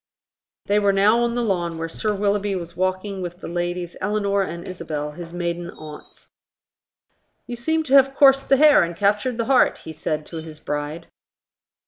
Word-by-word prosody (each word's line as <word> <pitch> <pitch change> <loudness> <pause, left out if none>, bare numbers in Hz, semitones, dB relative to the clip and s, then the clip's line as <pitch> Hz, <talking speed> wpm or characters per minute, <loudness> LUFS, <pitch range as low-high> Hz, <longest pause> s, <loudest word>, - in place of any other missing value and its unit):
They 205 +1 +2
were 200 -1 +2
now 205 +4 +4
on 235 0 0
the 240 - 0
lawn, 175 -6 -1
where 165 0 -3
Sir 210 +5 -2
Willoughby 200 0 0
was 170 -2 -6
walking 185 +1 -2
with 175 0 -6
the - - -8
ladies 175 0 -3
Eleanor 200 0 0
and 170 -2 -5
Isabel, 155 -5 -5
his 165 +2 -9
maiden 175 0 -3
aunts. 155 -3 -12 1.1
"You 240 - -6
seem 320 +7 0
to 275 -3 -3
have 270 0 +6
coursed 275 -1 +5
the 270 - +5
hare 300 +1 +6
and 170 0 -2
captured 210 +4 +1
the 230 - -1
hart." 260 -1 +3
he 160 - -7
said 155 0 -3
to 165 - -7
his 160 -1 -9
bride. 150 +3 -4
185 Hz, 180 wpm, -22 LUFS, 170-215 Hz, 1.1 s, have